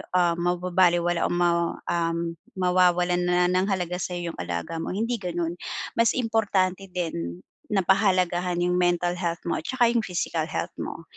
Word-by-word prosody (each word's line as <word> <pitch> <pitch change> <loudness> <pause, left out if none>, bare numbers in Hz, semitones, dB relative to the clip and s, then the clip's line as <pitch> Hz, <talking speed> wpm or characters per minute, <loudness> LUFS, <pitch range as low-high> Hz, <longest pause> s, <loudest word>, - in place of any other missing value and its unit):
ah, 175 -2 +3
mababalewala 175 -1 +2
o - - -4
ma, 170 -1 +2 0.2
um, 170 0 -1 0.2
mawawalan 180 -1 +3
na 180 0 +3
ng 185 +1 +2
halaga 180 -3 -1
sa'yo 175 -1 -3
yung - - -14
alaga 85 - -4
mo, 165 - -3
hindi 230 +3 -1
ganun. 175 -2 -3 0.4
Mas 230 - +4
importante 200 -5 0
din 125 - -4 0.2
na 195 -3 +1
pahalagahan 180 -2 +2
yung 180 0 +1
mental 175 0 +1
health 170 -2 -2
mo 170 - -1
at - - -11
tsaka 245 -3 +3
yung 235 -2 +1
physical 170 -3 -2
health - - -3
mo, 165 - -5
180 Hz, 160 wpm, -25 LUFS, 170-185 Hz, 0.4 s, Mas